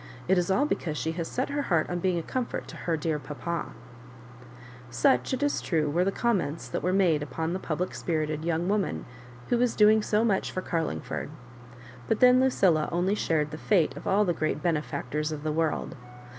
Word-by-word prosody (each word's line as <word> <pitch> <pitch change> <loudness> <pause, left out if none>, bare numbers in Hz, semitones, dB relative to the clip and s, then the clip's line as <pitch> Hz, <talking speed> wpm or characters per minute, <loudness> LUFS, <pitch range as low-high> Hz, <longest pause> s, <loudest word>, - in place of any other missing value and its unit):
It 185 0 +4
is 175 - -1
all 225 +10 +3
because 160 - -2
she 160 - -1
has 165 0 -4
set 255 - -2
her 285 0 -1
heart 170 - +1
on 175 - -2
being 180 0 +1
a 165 - -2
comfort 255 +5 -3
to - - -9
her 165 -2 -2
dear 155 0 -1
papal" 150 +4 -4 1.2
Such, 125 +1 +2
it 260 +2 -1
is 290 - +1
true, 155 -4 0
were 175 +4 +2
the 195 - +1
comments 190 -10 -1
that - - -3
were 180 - 0
made 180 -6 +3
upon 160 +4 -3
the 185 - -2
public 175 +1 -3
spirited 155 -2 -2
young 170 +1 0
woman 205 -1 -1 0.4
who 240 - +2
was 245 -1 +2
doing 215 +1 +6
so 210 +1 +1
much 200 -4 +1
for 185 - -3
Carlingford; 165 -3 -3 0.8
but 215 - +1
then 250 0 +6
Lucilla 185 -12 +3
only 175 +3 +1
shared 155 -7 0
the 155 - -7
fate 185 -7 +2
of - - -8
all 205 +2 +3
the 175 - +1
great 155 -2 -2
benefactors 150 -2 -1
of 150 -1 -5
the 155 - -1
world. 160 0 -1
170 Hz, 200 wpm, -27 LUFS, 155-200 Hz, 1.2 s, doing